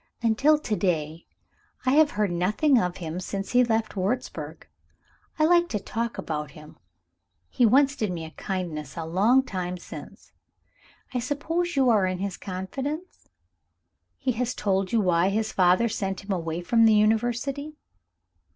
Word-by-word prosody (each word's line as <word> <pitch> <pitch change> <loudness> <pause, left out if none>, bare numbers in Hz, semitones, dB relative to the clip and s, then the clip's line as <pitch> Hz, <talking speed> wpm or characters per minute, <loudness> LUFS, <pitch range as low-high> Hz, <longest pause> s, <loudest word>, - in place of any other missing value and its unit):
"Until 275 +7 +4
to 240 -8 -2
day, 165 -4 -2 0.6
I 255 - +3
have 300 +2 +5
heard 210 -3 +1
nothing 215 - +2
of 180 0 -2
him 165 -1 -5
since 195 +1 -5
he 250 0 +5
left 225 -2 -1
Wurzburg. 185 - -3 0.7
I 310 - +3
like 345 +1 +4
to 210 - -2
talk 230 +3 -4
about 150 -2 -4
him 150 +1 -14 0.7
he 240 - +4
once 275 +4 +4
did 215 -7 -2
me 165 -2 -5
a 160 - -10
kindness 170 -8 -5
a 165 - -3
long 210 +11 +3
time 180 -6 -4
since. 175 - -11 0.8
I 250 - 0
suppose 325 +7 -2
you 265 -3 +4
are 205 -4 +3
in 185 0 -2
his 195 0 -3
confidence? 265 - -6 1.0
Has 250 -1 0
he - - -20
told 195 -2 0
you 230 - +3
why 180 -1 +2
his 215 +2 -1
father 185 +5 +3
sent 195 -3 -3
him 200 - -6
away 165 -2 -2
from 230 +5 +3
the 220 -1 +6
University?" 240 +7 0
210 Hz, 160 wpm, -26 LUFS, 180-250 Hz, 1.0 s, the